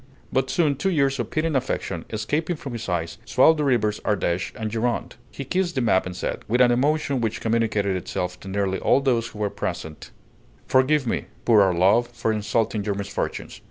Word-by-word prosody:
But 130 0 +1
soon 150 -5 +1
two 195 - 0
tears 140 -6 +1
of - - -2
pitying 155 -1 -1
affection, 130 0 -2
escaping 150 +11 -1
from 140 -4 -7
his 115 -3 -5
eyes, 85 -2 -2
swelled 130 +8 +4
the - - +1
rivers 115 -6 +1
Ardèche 90 -4 -1
and 110 -1 -4
Gironde. 115 +1 -1 0.2
He 140 - -7
kissed 180 +3 -1
the 130 - +1
map 95 -6 +2
and 90 - -6
said, 90 - -4
with 120 +4 +1
an 125 -1 +6
emotion 140 +1 +1
which 110 -1 -1
communicated 110 -4 0
itself 90 0 -4
to - - -11
nearly 95 0 -1
all - - +3
those 120 -4 +1
who 115 - -12
were 105 -1 -1
present: 80 -1 -5 0.6
"Forgive 130 +2 +3
me, 115 - -1 0.2
poor 110 -3 +6
old 95 -3 +3
love, 105 +7 +4
for 120 -2 -2
insulting 110 0 0
your 100 -1 -1
misfortunes. 100 0 -4
115 Hz, 195 wpm, -24 LUFS, 100-135 Hz, 0.6 s, an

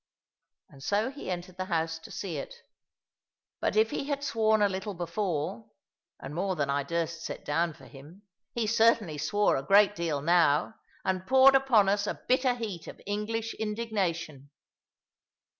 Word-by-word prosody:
And 135 - -16
so 210 - 0
he 280 -6 -8
entered 180 0 -5
the 185 - -3
house 160 -2 -1
to 160 - -13
see 175 -6 -5
it. 140 - -6 1.0
But - - -1
if 220 +1 +3
he - - -3
had 285 -1 -2
sworn 220 -5 +2
a - - +5
little 195 +1 -4
before 170 - -3 0.5
(and 145 - -8
more 185 +3 -1
than 140 -4 -1
I 140 +1 +1
durst 170 +2 -3
set - - -6
down 165 +3 0
for - - -16
him), 155 +8 -14 0.3
he 235 -2 -1
certainly 220 -7 +2
swore 205 +8 +2
a - - -2
great 200 +6 +5
deal 160 -5 -2
now, 165 +1 +3 0.3
and 185 0 -1
poured 265 +1 +7
upon 265 -7 +4
us 200 +1 +1
a - - -3
bitter 255 -1 +3
heat 210 -8 -6
of - - -10
English 220 +2 -2
indignation. 195 - -3
190 Hz, 165 wpm, -29 LUFS, 165-220 Hz, 1.0 s, poured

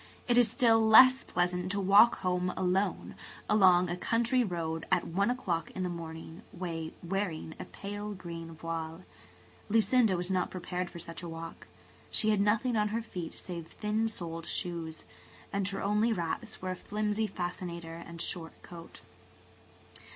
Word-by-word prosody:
It 240 - +3
is 240 -2 +6
still 225 0 +4
less 255 +4 +8
pleasant 180 +1 -1
to 200 - -1
walk 200 +4 +6
home 180 0 0
alone 190 +2 0 0.3
along 185 -4 +5
a 175 - -2
country 235 +6 +2
road, 165 -5 -3
at 180 -2 +3
one 200 +6 +1
o'clock 190 -10 -1
in 185 - -2
the 180 - -1
morning, 165 +1 -7
wearing 170 0 -4
a - - -5
pale 205 +1 -6
green 165 -2 -8
voile. 165 +1 -5 0.7
Lucinda 225 -2 +4
was 180 +2 -3
not 185 -1 +1
prepared 180 0 -4
for - - -10
such 165 0 -8
a 175 - -6
walk. 165 0 -8 0.4
She 215 - +2
had 205 -2 +2
nothing 225 +4 +2
on 210 -1 +2
her 225 +2 -2
feet 180 -7 -6
save 170 -3 -7
thin 215 +4 -1
soled 165 -5 -6
shoes, 165 -3 -3 0.5
and 200 -1 0
her 195 -1 -3
only 210 +3 +2
wraps 170 -2 -3
were 185 - -1
a - - -3
flimsy 210 +3 -1
fascinator 175 -3 -5
and 170 0 -10
a - - +2
short 165 -2 -2
coat. 170 -1 -11
185 Hz, 160 wpm, -31 LUFS, 170-210 Hz, 0.7 s, less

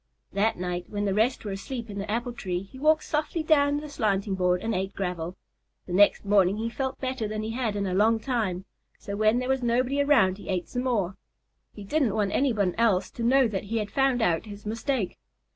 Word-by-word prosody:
That 210 +3 +1
night, 180 0 -3
when 205 -1 -2
the 195 - +1
rest 225 +4 +1
were 205 - -3
asleep 230 +5 -5
in 200 -2 -6
the 200 +1 -5
apple 240 +3 -2
tree, 185 -5 -3
he 260 +7 -13
walked 310 +2 +3
softly 305 +2 -1
down 290 -2 +3
the 300 +1 -5
slanting 205 -7 0
board 180 -1 +1
and 225 0 -1
ate 190 0 -2
gravel. 180 -2 -3 0.5
The 180 - -6
next 205 +2 +4
morning 200 -1 +3
he 230 +1 -2
felt 265 +1 -3
better 260 -4 -2
than 215 0 -3
he 220 - -3
had 230 -3 -2
in 200 -1 -1
a 185 - -2
long 220 +4 +3
time, 215 -7 -2 0.3
so 200 - -6
when 215 +2 +3
there 250 0 -1
was 265 0 +1
nobody 250 +4 +1
around 205 -10 +3
he - - -10
ate 185 -2 -1
some 250 0 -3
more. 200 -7 0 0.6
He 205 - -8
didn't 255 0 +1
want 205 -2 +1
anyone 215 -9 +1
else 200 -5 +2
to 235 - -5
know 260 +2 +4
that 195 -2 -3
he 225 +3 -2
had 210 -2 -2
found 270 -3 +2
out 170 +1 +1
his 205 0 -10
mistake. 225 -1 -2
215 Hz, 225 wpm, -27 LUFS, 195-255 Hz, 0.6 s, next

